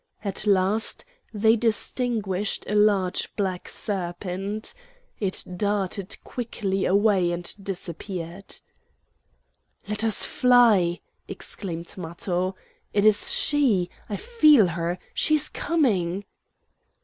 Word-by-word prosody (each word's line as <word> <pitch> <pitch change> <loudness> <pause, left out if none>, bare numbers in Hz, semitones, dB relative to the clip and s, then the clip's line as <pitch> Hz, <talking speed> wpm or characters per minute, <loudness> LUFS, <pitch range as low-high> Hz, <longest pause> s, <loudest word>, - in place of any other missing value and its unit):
At 200 +1 -1
last 200 - +1 0.3
they 220 +1 +3
distinguished 220 -3 -1
a - - -2
large 205 -3 +2
black 190 -3 -2
serpent. 195 +1 -3 0.5
It 195 -3 0
darted 200 -1 -1
quickly 200 -5 -3
away 195 -3 +3
and 175 0 -2
disappeared. 185 -1 -6 1.3
"Let 210 +1 -1
us 220 -3 +4
fly!" 230 -9 +4 0.3
exclaimed 170 -4 -5
Matho. 180 +2 -2 0.4
"It 205 0 +2
is 210 -1 +5
she! 230 -12 +2 0.2
I 205 - -2
feel 305 - +5
her; 170 +1 -2 0.2
she 310 - +3
is 300 0 +1
coming." 200 - 0
200 Hz, 100 wpm, -25 LUFS, 180-220 Hz, 1.3 s, is